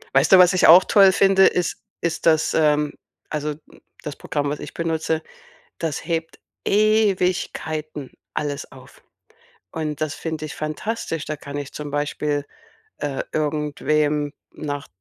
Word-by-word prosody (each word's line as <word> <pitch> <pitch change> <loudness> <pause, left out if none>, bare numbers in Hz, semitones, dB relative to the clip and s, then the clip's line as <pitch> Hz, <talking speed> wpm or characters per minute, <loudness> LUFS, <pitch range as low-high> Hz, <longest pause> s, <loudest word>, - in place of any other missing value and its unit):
Weißt 135 - +4
du, - - +11
was 180 0 +7
ich 185 - +4
auch 175 +3 +9
toll 195 -2 +6
finde, 195 0 +5
ist 180 -1 0 0.2
ist 165 -1 -2
das 160 -2 +3
ähm, 150 -1 +2 0.4
also, 150 0 -2 0.5
das 150 - -5
Programm, 145 -1 -2
was 145 - -3
ich - - -8
benutze, 160 -1 -1 0.6
das 160 -3 -3
hebt 165 -1 -3 0.3
Ewigkeiten 185 - 0 0.2
alles 145 -1 -3
auf. 130 -1 -16 0.7
Und 150 -2 -4
das 155 -2 -1
finde 160 0 -5
ich 155 - -7
fantastisch, 160 +1 -3
da 155 - -3
kann 145 0 -8
ich 145 -1 -6
zum 150 -1 -6
Beispiel, 145 0 -1 0.5
äh, 140 -2 -3
irgendwem 150 -1 0 0.2
nach 145 -2 -5
155 Hz, 140 wpm, -22 LUFS, 145-170 Hz, 0.7 s, du